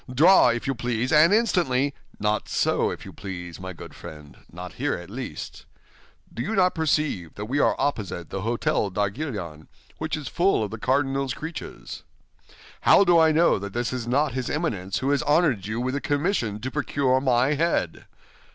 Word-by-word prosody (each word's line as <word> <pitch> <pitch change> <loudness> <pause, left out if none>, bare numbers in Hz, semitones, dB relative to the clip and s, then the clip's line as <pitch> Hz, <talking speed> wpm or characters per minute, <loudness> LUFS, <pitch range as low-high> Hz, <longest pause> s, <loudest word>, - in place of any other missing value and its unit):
Draw, 155 +3 +6
if 120 0 -1
you 135 - 0
please, 120 0 -2
and 155 +3 +6
instantly—" 170 - +2 0.3
"Not 105 +1 -1
so, - - +1
if - - -7
you - - -10
please, 90 -3 -7
my 95 0 -6
good 90 - -11
friend—not 80 +4 -11
here, - - -1
at - - -9
least. - - -7 0.7
Do 115 - -4
you 220 - -2
not 185 -1 +3
perceive 150 - -1
that 105 - -5
we 135 +6 -1
are - - +3
opposite 95 - -3
the 95 - -3
Hôtel 115 -2 0
d'Arguillon, 100 - -3 0.3
which 160 0 -2
is 150 - -7
full 175 - +2
of 105 - -4
the 110 - -6
cardinal's 135 +1 0
creatures? 160 +2 -7 0.8
How - - +6
do 175 -3 +5
I 160 -1 +5
know 160 -7 +3
that 100 0 -7
this 120 +1 -2
is 120 -2 -4
not 140 +4 +2
his 130 -1 -3
Eminence 100 - -2
who 135 +3 0
has 140 -3 +2
honored 145 - +2
you 110 +2 -3
with 130 +1 -1
the 140 - -2
commission 145 - -1
to 130 +2 -4
procure 135 -3 +1
my 130 +1 +2
head? 150 - -1
130 Hz, 180 wpm, -25 LUFS, 105-150 Hz, 0.8 s, Draw